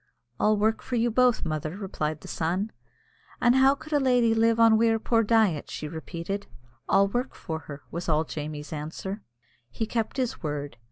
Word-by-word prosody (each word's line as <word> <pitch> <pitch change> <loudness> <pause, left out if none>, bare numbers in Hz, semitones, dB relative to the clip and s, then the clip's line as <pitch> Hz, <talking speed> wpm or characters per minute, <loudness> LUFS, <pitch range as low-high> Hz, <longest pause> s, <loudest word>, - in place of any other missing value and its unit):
"I'll 215 0 +3
work 220 +2 +1
for 250 - -4
you 235 0 +2
both, 250 -2 +3
mother," 155 +2 -3
replied 155 -6 -3
the - - -11
son. 185 +7 -1 0.7
"An' 240 0 +4
how 265 +1 +5
could 310 +2 -9
a 290 - +4
lady 245 -4 +3
live 230 0 +3
on 225 -1 +7
we'er 225 0 +3
poor 225 +1 +2
diet?" 215 -8 +2
she 155 - -5
repeated. 170 +5 -5 0.4
"I'll 195 0 +5
work 245 +5 -2
for 160 -3 -5
her," 145 -2 -10
was 170 0 -4
all 155 0 +3
Jamie's 150 -1 -6
answer. 165 +7 -5 0.5
He 220 - -3
kept 225 +2 -2
his 255 -3 -2
word. 145 -4 -4
205 Hz, 180 wpm, -27 LUFS, 160-230 Hz, 0.7 s, on